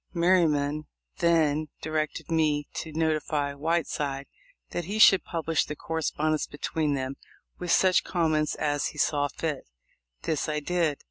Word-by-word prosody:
Merryman 155 -4 +2 0.3
then 155 -3 +3 0.2
directed 155 +1 -2
me 150 -3 +1
to 160 - -5
notify 155 -2 0
Whiteside 145 -2 -1 0.5
that 175 - -3
he 205 +5 -3
should 195 -3 +7
publish 165 -1 0
the 150 - -6
correspondence 155 -1 -1
between 145 0 -1
them, 130 0 -3 0.4
with 175 -1 -2
such 185 -1 +4
comments 155 -3 +1
as 145 -2 0
he - - -9
saw 145 -1 +2
fit. 150 -1 -4 0.6
This 155 -1 -1
I 150 0 0
did. 165 -2 0
155 Hz, 135 wpm, -27 LUFS, 145-165 Hz, 0.6 s, should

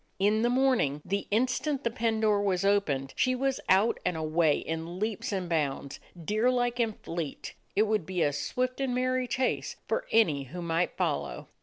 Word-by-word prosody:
In 210 +3 +2
the 240 - +3
morning, 245 - +2
the 200 +1 -2
instant 255 +5 0
the 235 - 0
pen 225 -2 0
door 210 -2 +3
was 195 -2 0
opened, 150 -10 +1
she 255 0 +2
was 270 +1 0
out 195 +5 +4
and 180 -2 0
away 155 -1 +2
in 165 +2 -4
leaps 215 +1 -2
and 190 -3 -2
bounds, 145 -4 -2 0.3
deer 215 +6 +2
like 245 -1 0
and 225 -3 0
fleet; 165 -4 -5 0.2
it 210 - +5
would 215 -6 0
be 185 -2 0
a 145 - +1
swift 255 - -2
and 260 -2 0
merry 255 0 0
chase 255 +1 -1
for - - -1
any 155 -12 +3
who 175 +7 -7
might 170 +1 0
follow. 70 0 -2
205 Hz, 185 wpm, -29 LUFS, 165-245 Hz, 0.3 s, it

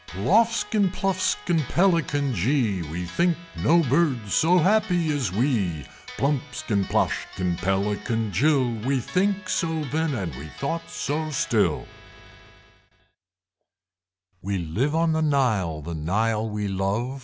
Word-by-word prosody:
Ploffskin, 205 - +2
Pluffskin, 185 -3 0
Pelican 165 -7 +2
jee! 105 - +1
We 85 +3 -4
think 170 - +1 0.3
no 170 +2 +5
Birds 130 - +1
so 175 +3 +4
happy 180 -4 +2
as 125 -10 -1
we! 100 - 0 0.3
Plumpskin, 135 -6 -1
Ploshkin, 90 -1 -1
Pelican 105 +3 -1
Jill! 135 - +2
We 135 +2 +1
think 190 - -1
so 170 - 0 0.2
then, 160 -1 0
and 90 - -3
we 75 +3 -8
thought 165 +4 -3
so 155 +2 -2
still 105 - 0 2.6
We 100 +1 -2
live 105 - -1
on 165 0 +2
the 160 0 +1
Nile. 110 - +1
The 85 +2 -5
Nile 110 +8 0
we 105 -1 -3
love. 100 +7 -2
130 Hz, 120 wpm, -24 LUFS, 100-160 Hz, 2.6 s, no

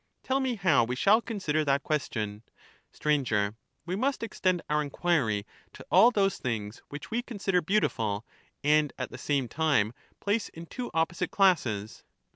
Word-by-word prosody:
Tell 265 +1 +1
me 260 -2 0
how 170 - +3
we 125 +2 -2
shall 205 - +4
consider 190 -10 -1
that 140 -1 +1
question. 110 -8 -2 0.5
Stranger. 125 -9 +1
Str, - - -22 0.4
We - - 0
Hiust 260 +4 -1
extend 185 -6 0
ouF 150 0 +1
enquiry 140 -9 0 0.3
to - - -12
all 200 +6 +8
those 195 -5 +1
things 110 -4 -3
^SocI^TEs. - - -19
which 145 +3 -8
we 235 +2 0
consider 200 -7 -1
beautiful 115 - 0 0.4
and 150 -1 +3
at 130 - -4
the - - -8
same 140 -4 0
time 140 -8 +1 0.3
place 205 +2 0
in 165 +1 -10
two 245 +8 -6
opposite 165 +2 0
classes. 120 - +1
155 Hz, 165 wpm, -28 LUFS, 125-195 Hz, 0.5 s, all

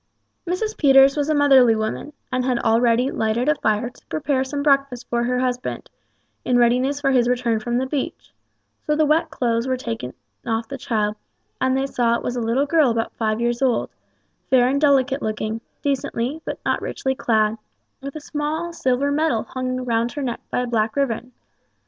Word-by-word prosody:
Mrs. 430 +5 -2
Peters 270 -1 +6
was 295 0 -1
a 310 - +2
motherly 265 -5 +6
woman, 220 +7 -3 0.2
and 255 0 0
had 250 -1 +1
already 235 +2 +2
lighted 220 +4 0
a 300 - +5
fire 220 -3 -1
to - - -23
prepare 280 -4 0
some 285 +2 -4
breakfast 275 -4 +1
for 235 0 0
her 250 +1 0
husband, 250 -1 -3 0.5
in 250 - +2
readiness 250 +4 +2
for 275 -1 +1
his 245 -2 +3
return 240 -3 +1
from 240 +2 -2
the 260 - 0
beach, 270 0 -4 0.5
so 300 - +2
the 310 0 +3
wet 315 +2 +2
clothes 235 -4 -1
were 260 0 0
soon 255 - -12
taken 225 - -4 0.3
off 225 -1 -2
the 275 +1 -7
child, 210 -2 -1 0.4
and 260 0 +2
they 270 - 0
saw 240 -3 +1
it - - -4
was 245 - -2
a 245 - -2
little 235 +5 +1
girl 300 -2 +3
about 230 -1 -1
five 215 -1 -1
years 240 +1 -1
old, 255 -3 +1 0.6
fair 250 -2 +5
and 280 +2 0
delicate 275 -2 +3
looking, 215 +1 -3 0.2
decently, 275 +1 -2
but - - -4
not - - 0
richly 265 - -2
clad, 220 -4 +1 0.4
with 275 +1 -7
a - - -4
small 310 +3 -3
silver 270 -2 0
medal 290 -6 +1
hung 255 0 -4
round 235 0 0
her 290 - -4
neck 240 -3 -3
by - - 0
a - - -1
black 225 -2 0
ribbon. 250 -3 -1
255 Hz, 195 wpm, -22 LUFS, 235-280 Hz, 0.6 s, Peters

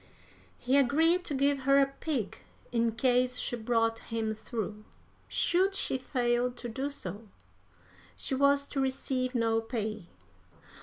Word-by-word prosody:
He 255 +3 +2
agreed 320 +7 +3
to 290 - -1
give 280 +1 +2
her 275 +1 +4
a 275 - +5
pig 265 -11 -3 0.3
in 230 -1 +1
case 250 +1 +2
she 245 - -1
brought 225 -1 0
him 225 -1 -3
through; 215 -1 -5 0.4
should 380 +3 +2
she 265 -8 0
fail 245 -1 0
to 245 - -7
do 265 +5 -3
so, 210 -5 -6 0.9
she - - -1
was 280 +1 +3
to 280 - -3
receive 260 -1 -1
no 225 -1 +2
pay. 215 -5 -4
250 Hz, 140 wpm, -30 LUFS, 225-275 Hz, 0.9 s, a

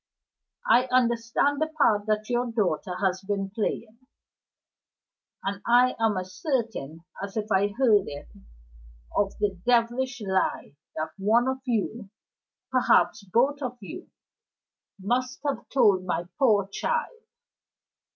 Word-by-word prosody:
I 240 +3 +5
understand 250 +3 +1
the 315 - +2
part 225 -10 +2
that 215 0 0
your 245 0 -1
daughter 180 -6 -1
has 190 0 0
been 195 -1 -3
playing 220 +2 -3 1.4
and 200 +1 -3
I 245 +2 +4
am 220 -3 +2
as 185 0 -5
certain 220 - -2 0.2
as 200 +2 -6
if 215 0 -3
I 195 +1 +3
had 205 - -11
heard 220 -7 +4
it, 145 0 -8 0.9
of 200 -1 0
the 200 -3 -1
devilish 245 +2 +1
lie 190 -7 -1 0.2
that 160 +1 -3
one 225 +5 +3
of 265 0 -1
you 225 -3 -2 0.6
perhaps 250 -4 +3
both 265 +9 +1
of 250 -2 -4
you 200 - -9 0.9
must 250 +6 -1
have 285 - -3
told 205 -8 +4
my 175 -1 -2
poor 210 -7 +3
child. 475 - -2
220 Hz, 130 wpm, -26 LUFS, 195-250 Hz, 1.4 s, I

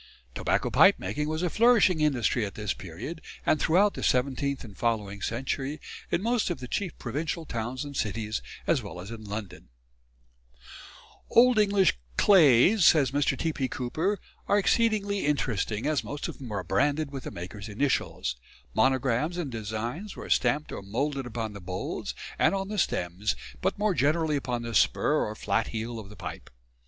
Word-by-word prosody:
Tobacco - - 0
pipe - - +6
making 150 +11 -3
was 155 +2 -2
a 180 - +1
flourishing 215 -8 +4
industry 130 -5 +2
at 100 - -5
this 105 -2 -2
period 105 - -7 0.2
and 155 - +3
throughout 195 +5 +4
the - - -6
seventeenth 135 +2 0
and 105 -5 -11
following 105 -4 -1
century 135 +6 -2 0.3
in 180 - 0
most 235 -2 +1
of 175 - -3
the 125 - -7
chief 185 - -3
provincial 155 +6 -3
towns 120 +2 -4
and 140 -1 -8
cities 110 -2 -2 0.2
as - - +2
well 90 - -8
as 95 +5 -8
in 115 -1 -8
London. 105 -1 -7 1.6
"Old 245 -1 +6
English 200 - +3 0.2
'clays,'" 180 - +6
says 145 -6 +5
Mr. 145 +1 +1
T.P. 155 -5 -1
Cooper, 155 +12 -1 0.3
"are 205 - +4
exceedingly 205 -1 +2
interesting, 115 -7 0
as 150 -1 +1
most 145 0 -4
of - - -8
them 125 -5 -8
are 100 -3 -2
branded 145 - +1
with 135 -2 -6
the - - -3
maker's 100 +4 -7
initials. 110 - -1 0.4
Monograms 130 +5 +2
and 160 -7 -3
designs 115 - -4
were - - -7
stamped 150 +1 +2
or - - -5
moulded 135 +7 -2
upon 115 -2 -4
the 100 - -9
bowls 90 +1 -4 0.2
and - - +4
on 195 0 -3
the 210 -1 -2
stems, 90 - 0 0.3
but - - 0
more 210 -1 +2
generally 155 +1 +2
upon 125 -4 -2
the 115 0 -5
spur 150 +6 +3
or 105 - -5
flat 100 -1 0
heel 115 +1 -4
of 100 -3 -10
the 105 - -12
pipe. 80 -9 -8
135 Hz, 170 wpm, -28 LUFS, 110-160 Hz, 1.6 s, pipe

